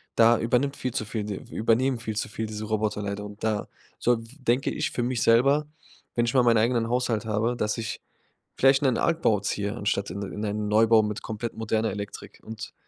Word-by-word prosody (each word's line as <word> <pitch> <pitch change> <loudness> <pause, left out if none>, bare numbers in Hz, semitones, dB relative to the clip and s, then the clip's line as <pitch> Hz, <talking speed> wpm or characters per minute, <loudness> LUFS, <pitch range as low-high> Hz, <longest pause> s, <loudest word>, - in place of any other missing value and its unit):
Da 115 0 +5
übernimmt 125 +4 +1
viel 130 -2 -3
zu 110 - -2
viel 105 0 -3
d 105 -1 -3 0.2
übernehmen 120 +3 +1
viel 110 -2 -4
zu 110 - -2
viel 110 +1 -4
diese 110 0 -5
Roboter 110 -1 -1
leider. 100 0 -4
Und 105 0 -11
da 110 -2 0 0.3
so 120 - +3
denke 125 +2 -1
ich - - -2
für 120 - -2
mich 120 -2 -1
selber, 135 +6 +4 0.5
wenn 120 - +2
ich 120 - -1
mal 130 - +5
meinen 115 -2 +4
eigenen 115 0 +2
Haushalt 120 -3 0
habe, 110 +3 0
dass 105 0 -1
ich 115 -1 -4 0.6
vielleicht 135 0 +5
'nen 130 -4 +2
Altbau 160 -11 +2
ziehe 100 +1 -2
anstatt 100 -3 -1
in 100 +3 -5
in 105 +2 -5
einen 105 0 -2
Neubau 110 +1 +5
mit 105 0 -3
komplett 110 +1 -5
moderner 110 0 0
Elektrik. 100 -1 -8
Und 110 +1 -8
110 Hz, 205 wpm, -26 LUFS, 105-120 Hz, 0.6 s, Da